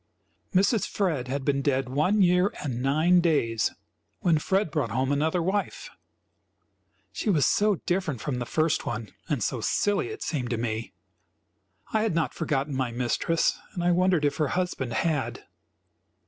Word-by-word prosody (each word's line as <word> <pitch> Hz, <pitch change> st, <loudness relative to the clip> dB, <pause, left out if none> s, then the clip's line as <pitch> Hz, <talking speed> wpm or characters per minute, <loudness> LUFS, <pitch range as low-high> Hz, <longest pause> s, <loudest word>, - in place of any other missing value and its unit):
Mrs. 200 Hz, +2 st, +3 dB
Fred 160 Hz, -11 st, -1 dB
had 135 Hz, +1 st, -3 dB
been 140 Hz, -1 st, +1 dB
dead 135 Hz, -2 st, 0 dB
one 155 Hz, +11 st, +2 dB
year 180 Hz, +2 st, +3 dB
and 125 Hz, -4 st, -3 dB
nine 155 Hz, +7 st, +4 dB
days 115 Hz, -, +1 dB, 0.5 s
when 165 Hz, -3 st, +3 dB
Fred 190 Hz, +2 st, 0 dB
brought 150 Hz, -6 st, -1 dB
home 130 Hz, +5 st, 0 dB
another 160 Hz, +4 st, +1 dB
wife. 195 Hz, +3 st, -2 dB, 1.2 s
She -, -, -3 dB
was 155 Hz, -8 st, +3 dB
so 210 Hz, 0 st, +3 dB
different 175 Hz, -8 st, -1 dB
from 125 Hz, +2 st, -3 dB
the 120 Hz, -, -4 dB
first 155 Hz, +2 st, +1 dB
one, 110 Hz, -2 st, -4 dB, 0.2 s
and 140 Hz, -8 st, 0 dB
so 120 Hz, +2 st, -1 dB
silly, 205 Hz, -, +1 dB
it 430 Hz, +1 st, -6 dB
seemed 130 Hz, -7 st, -2 dB
to 120 Hz, -, -1 dB
me. 115 Hz, -1 st, -3 dB, 1.0 s
I 220 Hz, -, +3 dB
had 215 Hz, -6 st, 0 dB
not 165 Hz, -2 st, 0 dB
forgotten 145 Hz, -3 st, -1 dB
my 130 Hz, -2 st, 0 dB
mistress 125 Hz, +7 st, 0 dB, 0.2 s
and 175 Hz, -, -2 dB
I 175 Hz, -, +3 dB
wondered 180 Hz, -3 st, +3 dB
if 145 Hz, -, 0 dB
her 155 Hz, -, +1 dB
husband 140 Hz, -10 st, -2 dB
had. 145 Hz, +3 st, -1 dB
150 Hz, 160 wpm, -26 LUFS, 130-180 Hz, 1.2 s, nine